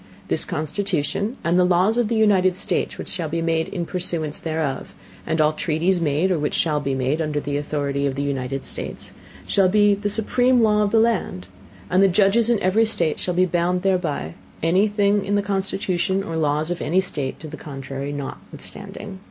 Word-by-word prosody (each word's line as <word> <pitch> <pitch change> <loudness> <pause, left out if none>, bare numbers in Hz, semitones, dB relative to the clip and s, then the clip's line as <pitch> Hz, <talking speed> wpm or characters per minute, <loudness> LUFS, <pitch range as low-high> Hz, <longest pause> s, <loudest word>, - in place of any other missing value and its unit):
This - - 0
Constitution, 195 - -2
and 170 +2 +2
the - - +5
Laws 180 +4 +3
of 240 -2 +2
the 230 - -1
United 195 -4 +3
States - - -1
which - - -6
shall 165 -4 -2
be 165 +2 -2
made 165 -1 0
in 175 -4 -4
Pursuance 165 -4 -3
thereof; 155 -4 -3 0.3
and 160 - 0
all 155 0 +4
Treaties 170 +4 0
made, 160 +4 +1
or 175 - +1
which 150 - -1
shall 150 -3 +1
be 140 -2 -2
made, 135 +5 0
under 150 -2 -1
the 145 0 -3
Authority 145 -1 -1
of 135 - -2
the 140 - -2
United 135 -1 -3
States, - - -6 0.3
shall 195 -2 +3
be 205 +1 +4
the 205 +1 -2
supreme 245 +3 +3
Law 210 -1 +3
of 205 - +2
the 225 - +2
Land; 220 - 0 0.4
and 185 - +3
the 195 - +6
Judges 205 +5 +3
in 235 -3 +3
every 200 +5 +3
State 170 -8 0
shall 180 - -2
be 185 +1 +4
bound 180 0 0
thereby, 170 - 0 0.3
any 185 +6 +3
Thing 205 -1 +2
in 205 +1 0
the 205 - +1
Constitution 195 -1 -1
or 165 -3 -5
Laws 155 +1 0
of 175 - -3
any 175 +4 +2
State 145 -8 -2
to 160 - -8
the - - -8
Contrary 135 -1 -6
notwithstanding. 190 +7 -7
175 Hz, 200 wpm, -22 LUFS, 150-200 Hz, 0.4 s, the